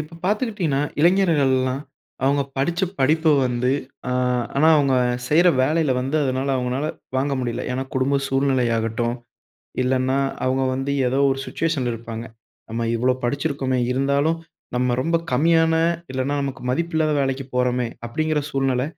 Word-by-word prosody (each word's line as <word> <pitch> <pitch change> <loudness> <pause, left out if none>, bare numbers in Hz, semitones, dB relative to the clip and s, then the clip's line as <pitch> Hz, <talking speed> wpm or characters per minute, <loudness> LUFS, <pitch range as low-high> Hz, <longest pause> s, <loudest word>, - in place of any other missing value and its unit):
இப்ப 155 +2 -8
பார்த்துக்கிட்டீங்கன்னா, 205 - 0 0.2
இளைஞர்கள் 170 -5 +4
எல்லாம் 130 +1 -1 0.4
அவுங்க 140 +1 +3
படிச்ச 170 +7 0 0.2
படிப்ப 155 +5 +2 0.2
வந்து 125 0 0 0.4
அ - - -1 0.5
ஆனா, 155 +3 +5
அவுங்க 140 -3 +2 0.3
செய்ற 170 +4 +5
வேலையில 155 +2 +1
வந்து 135 +4 -1
அதனால 130 +1 -1
அவுங்கனால 125 +3 -1 0.3
வாங்க 140 +2 0
முடியல. 120 -2 -3
ஏனா 130 +1 -2
குடும்ப 135 +2 +2
சூழ்நிலையாகடடும், 120 -4 0 0.7
இல்லன்னா 130 +1 +1 0.3
அவுங்க 130 +1 +1
வந்து 135 +2 -2 0.2
எதோ 130 +2 +1
ஒரு 135 - -1
சுச்சுவேஷன்ல 145 -7 -1
இருப்பாங்க. 115 0 -7 0.5
"நம்ம 115 +1 -2
இவ்வளோ 125 +2 +2
படிச்சிருக்கோமே, 140 0 -1
இருந்தாலும் 140 +5 +1 0.4
நம்ம 125 0 +1
ரொம்ப 165 +1 +1 0.2
கம்மியான, 165 +4 +3 0.4
இல்லன்னா 130 +2 -1
நமக்கு 135 -1 -5
மதிப்பில்லாத 160 +1 0
வேலைக்கு 135 0 -1
போறோமே!" 125 -1 +1 0.2
அப்படிங்கிற 155 +5 -1
சூழ்நில 135 -2 0
135 Hz, 135 wpm, -22 LUFS, 125-155 Hz, 0.7 s, ஆனா